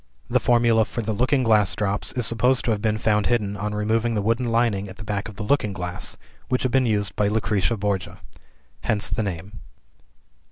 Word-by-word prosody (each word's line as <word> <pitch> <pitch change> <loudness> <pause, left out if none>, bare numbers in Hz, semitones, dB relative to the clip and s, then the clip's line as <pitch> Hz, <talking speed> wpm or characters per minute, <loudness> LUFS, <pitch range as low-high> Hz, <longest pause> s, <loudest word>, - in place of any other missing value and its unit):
The - - +4
formula 115 -2 +3
for 115 - -4
"The 110 +1 -2
Looking 130 +4 +1
Glass 105 -4 +3
Drops" 105 -1 -1
is 125 -2 +1
supposed 125 +4 +2
to 115 - +2
have 105 -2 -1
been 110 0 +1
found 105 -1 +1
hidden 105 -4 0
on 105 +1 -3
removing 110 +2 0
the 105 - 0
wooden 115 +3 0
lining 115 -4 +1
at 95 - -11
the - - -9
back 105 0 -3
of 100 - -12
a - - -3
looking 105 -4 +1
glass, 90 -1 -4 0.3
which 125 - 0
had 130 - 0
been 130 -1 +3
used 105 -3 0
by 105 - +1
Lucrezia 105 0 0
Borgia. 100 -2 -2 0.6
Hence 105 -3 0
the - - 0
name. 95 - -5
105 Hz, 205 wpm, -23 LUFS, 100-115 Hz, 0.6 s, The